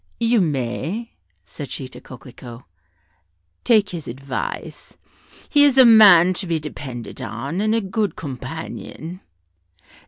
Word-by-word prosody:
"You 230 -1 +2
may," 155 - -3 0.3
said 140 +8 -9
she 130 - -6
to - - -13
Coquelicot, 125 -1 -12 1.0
"take 215 -4 +3
his 170 -4 -7
advice; 135 +2 -6 0.5
he 290 -1 +4
is 280 -2 +4
a 260 - +9
man 200 -6 +8
to 185 - -6
be 165 -1 0
depended 130 -6 -8
on, 135 - -4
and 215 +1 +1
a 230 - +1
good 195 -1 -2
companion. 160 +5 -7
160 Hz, 125 wpm, -21 LUFS, 130-215 Hz, 1.0 s, a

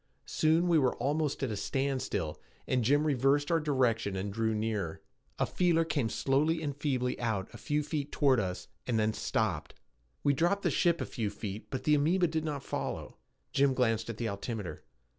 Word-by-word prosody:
Soon 160 +3 +2
we 170 -2 +5
were 130 -3 +2
almost 145 +2 -1
at 130 - 0
a - - -2
standstill, 130 - -2 0.2
and 125 -2 +1
Jim 145 +6 +3
reversed 145 +1 +2
our 165 - +4
direction 125 -9 +1
and 95 +1 -3
drew 110 0 0
nearer. 105 -6 -2 0.4
A - - +2
feeler 170 -2 +2
came 145 -8 0
slowly 150 +7 +1
and 145 -2 -2
feebly 130 -4 -1
out 110 -4 -2
a - - -10
few 150 0 0
feet 145 -1 -3
toward 135 -4 +3
us 90 -3 -3 0.2
and 120 -3 +1
then 110 0 +2
stopped. 95 -9 -1 0.5
We 145 - +4
dropped 175 +8 +1
the - - +2
ship 170 -2 +2
a - - -1
few 110 -4 -2
feet 105 0 -6
but 130 -2 -4
the 150 - +3
amoeba 165 +5 +3
did 160 -1 -1
not 150 -3 -3
follow. - - -4 0.4
Jim 135 -1 +3
glanced 115 -3 +1
at 115 - -4
the 115 - -2
altimeter. 100 -4 -4
130 Hz, 190 wpm, -31 LUFS, 110-150 Hz, 0.5 s, we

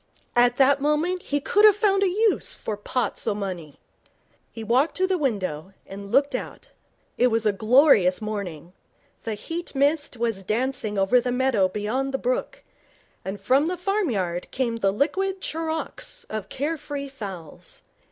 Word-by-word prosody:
At 245 0 +4
that 275 +1 +4
moment 310 +5 +1
he 290 - -1
could 410 +8 +2
have 425 -2 +8
found 405 -2 +2
a 395 - +3
use 425 +3 +1
for 215 - -4
pots 235 +5 -2
o' 210 - +1
money. 180 -7 -5 0.8
He 225 - -7
walked 250 +8 +2
to 375 - +2
the 375 0 +1
window, 195 - -2
and 200 +1 -9
looked 280 +3 +3
out. - - -6 0.5
It 250 - +5
was 225 -2 0
a 210 - +4
glorious 215 - +4
morning. 185 -6 -5 0.5
The 225 -2 -2
heat 330 +9 -6
mist 290 -1 +1
was 225 -4 -2
dancing 225 0 -2
over 195 +6 +4
the 245 - -2
meadow 250 -6 +2
beyond 250 +7 -2
the - - +1
brook, - - -2 0.6
and 195 +2 -5
from 265 +9 +2
the 360 +1 -2
farmyard 245 - -1
came 240 -3 -1
the 195 -3 +2
liquid 380 - 0
charawks 320 -2 -4
of 215 -2 -5
care 300 +5 -2
free 285 -1 -6
fowls. 195 - -9
250 Hz, 160 wpm, -24 LUFS, 205-310 Hz, 0.8 s, have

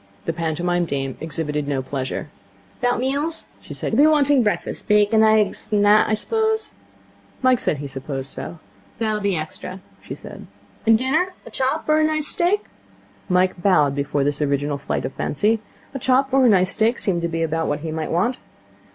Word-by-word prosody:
The 165 - -1
pantomime 170 +2 -1
dame 135 -4 -3
exhibited 150 -2 -3
no 135 -2 -1
pleasure. 135 +2 -4 0.5
''Bout 245 0 +2
meals?' 285 +6 -1 0.2
she - - -9
said. - - -4
'You'll - - +5
be 305 - +7
wanting 290 -3 +4
breakfast. 210 -3 -2
Bacon, 210 +1 +4
aigs, 215 -2 +2
an' 205 -1 +3
that, 210 +1 +5
I 215 - +3
suppose?' 440 - -1 0.7
Mike 255 -1 +4
said - - -1
he 145 - -6
supposed 135 0 -6
so. 170 - -7 0.4
'That'll 215 -2 -1
be 200 -2 +1
extra,' 180 +4 -6 0.2
she - - -7
said. - - -11 0.4
'And 225 -1 +7
dinner? 315 +10 0
A - - -11
chop, 265 +5 -1
or 305 0 +4
a - - +3
nice 310 -1 +1
steak?' 365 +4 +1 0.6
Mike 180 0 +2
bowed 150 -7 +4
before 140 0 -1
this 145 +1 -1
original 145 0 0
flight 140 - -2
of 130 - -4
fancy. 210 +8 0 0.3
A 270 - -4
chop 260 +2 +2
or 265 -2 +5
a - - +6
nice 185 -2 +4
steak 225 +2 +1
seemed 175 -4 -1
to 170 - 0
be 165 0 -2
about 160 0 -1
what 145 0 -2
he 160 0 -4
might 155 0 -3
want. 215 +10 0
195 Hz, 190 wpm, -22 LUFS, -, 0.7 s, be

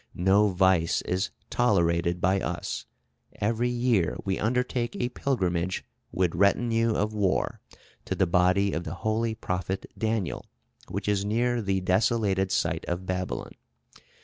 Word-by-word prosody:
No 95 +4 +4
vice 95 -3 +2
is 95 +4 -1 0.2
tolerated 85 -6 +2
by 95 +2 +2
us. - - -4 0.5
Every 115 +4 0
year 120 -8 +1
we 95 -1 -1
undertake 125 +1 0
a 120 - -1
pilgrimage, 90 -10 -1 0.3
with 90 -2 +1
retinue 115 +2 +2
of 105 +1 0
war, 100 -3 0 0.4
to - - -2
the - - +3
body 90 +3 +3
of 85 - -2
the 85 +2 -5
holy 110 +1 +1
prophet 95 -1 -3
Daniel, 110 -6 -2 0.4
which - - -4
is 100 -1 +1
near 120 +3 +1
the 95 -2 0
desolated 95 0 +1
site - - 0
of 90 +2 -3
Babylon. 90 0 -3
100 Hz, 135 wpm, -27 LUFS, 90-115 Hz, 0.5 s, No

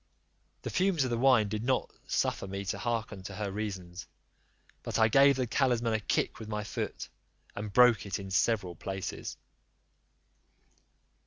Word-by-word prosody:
The - - -4
fumes 185 -5 +2
of 130 - -2
the 120 - 0
wine 125 -5 +5
did 105 +1 -3
not 130 +1 0 0.2
suffer - - 0
me 100 +1 -5
to - - -3
hearken 115 -4 -2
to 95 +1 -8
her 105 -1 -3
reasons; 95 -3 -5 0.7
but - - -3
I 110 -1 +5
gave 140 +4 +6
the 130 -1 0
talisman 120 -2 +1
a 110 - +1
kick 105 - -1
with 110 -1 -8
my 105 -1 -2
foot, - - -4 0.5
and 105 0 -5
broke 120 -3 +5
it 100 - -2
in 95 -1 -8
several 100 -2 +1
pieces. 95 +3 -5
110 Hz, 160 wpm, -30 LUFS, 100-125 Hz, 0.7 s, gave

